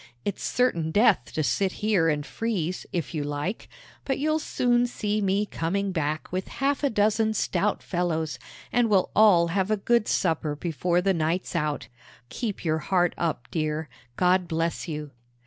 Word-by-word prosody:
It's 200 - -3
certain 175 -11 +1
death 200 - +3
to 155 - 0
sit 185 +9 +1
here 200 -6 +2
and 150 -1 -1
freeze, 185 -7 -3
if 175 -1 -3
you 150 -3 -1
like; 145 +8 -4 0.3
but 270 - -1
you'll 310 +2 +1
soon 245 -4 +1
see 215 -3 -2
me 200 +1 +1
coming 195 +2 -2
back 155 -3 -2
with 185 +1 -2
half 275 +1 -1
a 280 - +3
dozen 220 0 +2
stout 200 +1 0
fellows, 160 -6 -1 0.3
and 240 -1 +2
we'll 195 -3 +3
all 185 -6 +6
have 190 +3 0
a 215 - +2
good 235 +2 +2
supper 160 -4 0
before 175 +3 0
the 195 +1 +2
night's 170 +2 -1
out. 150 -3 -1 0.4
Keep 215 -7 -4
your 160 -1 +1
heart 175 +1 +1
up, 160 -7 -2
dear. 155 -1 -2 0.3
God 180 0 +3
bless 165 +1 -2
you!" 150 -2 -5
180 Hz, 165 wpm, -26 LUFS, 160-210 Hz, 0.4 s, all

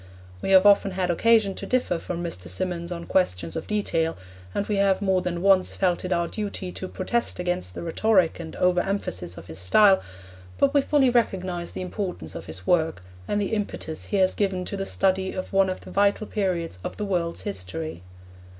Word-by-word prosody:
We - - -3
have 190 0 +7
often 200 -1 +6
had 185 -1 0
occasion 215 +2 +3
to - - -7
differ 245 -9 +1
from 175 0 -4
Mr. 95 - -4
Symonds 170 - -3
on 170 -1 -5
questions 90 - 0
of - - -4
detail, 165 -6 0 0.3
and 200 - -1
we 210 -1 -1
have 195 -1 +3
more 190 -2 +2
than 180 -1 -3
once 195 -2 +4
felt 180 -3 +1
it 185 - -4
our 170 -1 +1
duty 200 -3 -4
to 185 - -6
protest 235 +6 -2
against 175 - -2
the - - -5
rhetoric 180 +1 +2
and 160 -2 -7
over 180 0 +3
emphasis 90 - -3
of - - -9
his 80 +1 -8
style, 190 - +5 0.6
but 280 0 +3
we 285 - +5
fully 270 -2 +3
recognise 185 -7 0
the - - -5
importance 180 - -4
of - - -8
his 90 +3 -7
work 160 - +1 0.2
and 205 - 0
the 205 +2 -1
impetus 200 -6 -3
he 205 - -1
has 185 -1 +4
given 190 -3 -1
to 200 - -4
the 195 0 -3
study 190 0 +1
of 185 +1 -5
one 195 -1 +4
of 185 - -4
the - - -11
vital 200 +2 +2
periods 180 - -2
of - - -5
the 210 - -2
world's 175 -4 -1
history. 95 - -5
185 Hz, 205 wpm, -25 LUFS, 170-200 Hz, 0.6 s, have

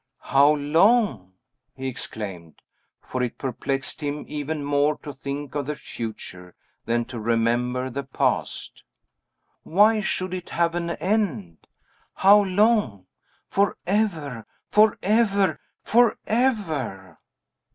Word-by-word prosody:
"How 140 +2 +5
long!" 150 - +2 0.4
he 135 0 -5
exclaimed; 95 - -7 0.4
for 130 - -4
it 125 -2 -2
perplexed 135 +2 -3
him 145 0 -3
even 150 0 -4
more 145 +1 +2
to 145 - -7
think 140 +1 -6
of 145 -2 -3
the 150 - -2
future 90 -8 -8 0.3
than 120 0 0
to 120 -1 -7
remember 120 +3 0
the 140 +3 -3
past. 135 -1 -2 0.8
"Why 210 +5 +4
should 185 -2 -2
it 180 -1 -6
have 170 0 +1
any 170 0 -3
end? 150 - -2 0.5
How 205 +2 +6
long! 200 - +2 0.4
Forever! 185 - -1 0.2
forever! 210 -1 +3 0.2
forever!" 205 - 0
145 Hz, 105 wpm, -24 LUFS, 120-195 Hz, 0.8 s, How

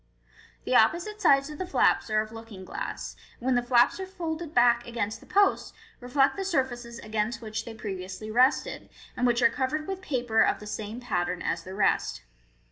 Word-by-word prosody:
The - - -1
opposite 420 +5 +3
sides 280 -4 +4
of 300 - -9
the 370 - -2
flaps 360 - +2
are 215 0 +2
of 215 0 -7
looking 225 -4 -10
glass, - - -5 0.2
and 240 - -10
when 260 - +3
the 245 - +3
flaps 240 +6 +3
are 380 - -4
folded 335 -4 -5
back 240 -2 +4
against 225 -2 -3
the - - -17
posts, 400 0 +2 0.3
reflect 270 +3 +2
the 390 - -2
surfaces 255 -9 -2
against 215 +2 -2
which 220 -1 -5
they 230 - -8
previously 195 0 -6
rested, 255 +5 +2 0.3
and 250 - +1
which 240 0 +2
are 235 - +7
covered 300 +3 -2
with 385 -1 -4
paper 245 -9 +1
of - - +2
the 210 - -10
same 215 +2 -5
pattern 175 -6 -2
as - - -2
the 185 +1 -8
rest. 195 -1 +1
240 Hz, 195 wpm, -27 LUFS, 215-285 Hz, 0.3 s, are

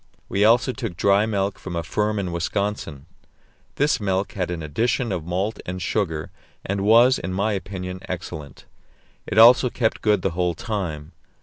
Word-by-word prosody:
We 100 - +1
also 115 +4 +4
took 115 -10 -5
dried 100 +3 +3
milk 100 -2 -1
from 90 -2 -6
a 85 - -2
firm 105 +5 -1
in 95 -3 -2
Wisconsin; 85 -4 -3 0.7
this 145 -2 +2
milk 95 -1 -1
had 90 -3 -3
an 85 -2 -4
addition 115 - 0
of 90 -4 -3
malt 95 +5 -2
and 90 +1 -5
sugar, 85 -4 -2 0.3
and 100 0 -2
was, 115 +5 +5
in 90 +2 -4
my 100 +3 0
opinion, 95 -2 -5
excellent; 85 -6 -7 0.6
it - - -3
also 120 +3 +8
kept 115 -2 -1
good 105 -4 +2
the 95 - +1
whole 90 0 -1
time. 85 -7 -4
95 Hz, 170 wpm, -23 LUFS, 90-110 Hz, 0.7 s, also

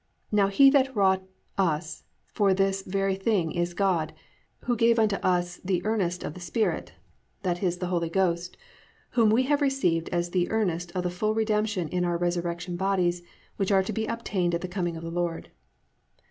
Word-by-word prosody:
Now 205 -2 +4
he 270 +8 +6
that 270 -2 +2
wrought 190 -2 +3 0.4
us 160 -3 -1 0.2
for 195 -3 +1
this 195 0 +1
very 195 +1 -1
thing 190 -4 0
is 175 0 -2
God, 175 -6 +1 0.5
who 245 - 0
gave 230 +1 +3
unto 215 -3 +2
us 175 -1 0
the 185 0 -1
earnest 185 -5 0
of - - -4
the 185 - -10
Spirit+ 215 +5 -1 0.5
(i.e., 180 +1 +1
the 180 +1 -4
Holy 170 -2 -1
Ghost, 175 -1 0 0.5
whom 230 -3 +4
we 230 +4 +4
have 290 +2 +1
received 185 - +1
as 175 0 -1
the 180 -1 +1
earnest 175 -6 -1
of 180 - -1
the 180 - -1
full 215 +4 -1
redemption 215 -5 0
in 180 +2 -1
our 175 -1 0
resurrection 175 0 -2
bodies 180 -2 +1 0.4
which 195 0 0
are 190 -1 +4
to 215 - -4
be 220 +2 -2
obtained 185 -7 -1
at 170 - -3
the 185 - -3
coming 175 -2 -3
of 165 - -8
the 165 - -5
Lord). 175 -1 -3
185 Hz, 185 wpm, -27 LUFS, 175-210 Hz, 0.5 s, he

